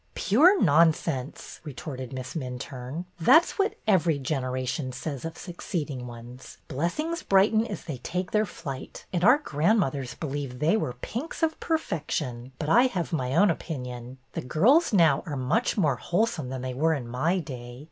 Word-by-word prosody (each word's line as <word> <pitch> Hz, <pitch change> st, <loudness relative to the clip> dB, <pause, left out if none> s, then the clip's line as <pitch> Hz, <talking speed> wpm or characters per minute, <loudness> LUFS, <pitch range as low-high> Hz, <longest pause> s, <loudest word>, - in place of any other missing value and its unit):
'' -, -, -39 dB
Pure 330 Hz, -, +5 dB
nonsense," 155 Hz, -4 st, +1 dB
retorted 130 Hz, -4 st, -7 dB
Miss 130 Hz, -1 st, -6 dB
Minturne. 130 Hz, +2 st, -5 dB
That 320 Hz, -, +7 dB
's -, -, -9 dB
what 395 Hz, +2 st, +1 dB
every 170 Hz, -7 st, +3 dB
generation 130 Hz, -1 st, -2 dB
says 135 Hz, +1 st, -5 dB
of 165 Hz, 0 st, -6 dB
succeed 170 Hz, -3 st, -4 dB
ing 125 Hz, -2 st, -6 dB
ones. 120 Hz, +2 st, -11 dB
Blessings 300 Hz, -, -2 dB
brighten 215 Hz, +4 st, +3 dB
as 200 Hz, -, -6 dB
they 150 Hz, -6 st, -5 dB
take 180 Hz, +7 st, -3 dB
their 215 Hz, 0 st, +2 dB
flight, 140 Hz, -7 st, -8 dB
and 175 Hz, -1 st, 0 dB
our 245 Hz, +7 st, +7 dB
grandmothers 150 Hz, -, 0 dB
believe 140 Hz, -4 st, -4 dB
they 155 Hz, +9 st, +2 dB
were 170 Hz, -, -1 dB
pinks 285 Hz, +8 st, -5 dB
of 320 Hz, -1 st, +1 dB
perfection. 150 Hz, -, -2 dB
But 150 Hz, -, -4 dB
I 240 Hz, +9 st, +6 dB
have 180 Hz, -8 st, -3 dB
my 130 Hz, -3 st, -1 dB
own 185 Hz, +2 st, +5 dB
opinion. 125 Hz, -6 st, -6 dB, 0.2 s
The -, -, -3 dB
girls 230 Hz, -, +4 dB
now 165 Hz, -8 st, +4 dB
are 145 Hz, -3 st, -3 dB
much 175 Hz, -, 0 dB
more 150 Hz, -10 st, +2 dB
wholesome 175 Hz, -, -1 dB
than 130 Hz, -1 st, -5 dB
they 130 Hz, -1 st, -3 dB
were 160 Hz, +5 st, +2 dB
in 125 Hz, -5 st, -5 dB
my 150 Hz, +10 st, 0 dB
day. 125 Hz, -7 st, -7 dB
155 Hz, 170 wpm, -27 LUFS, 130-190 Hz, 0.2 s, That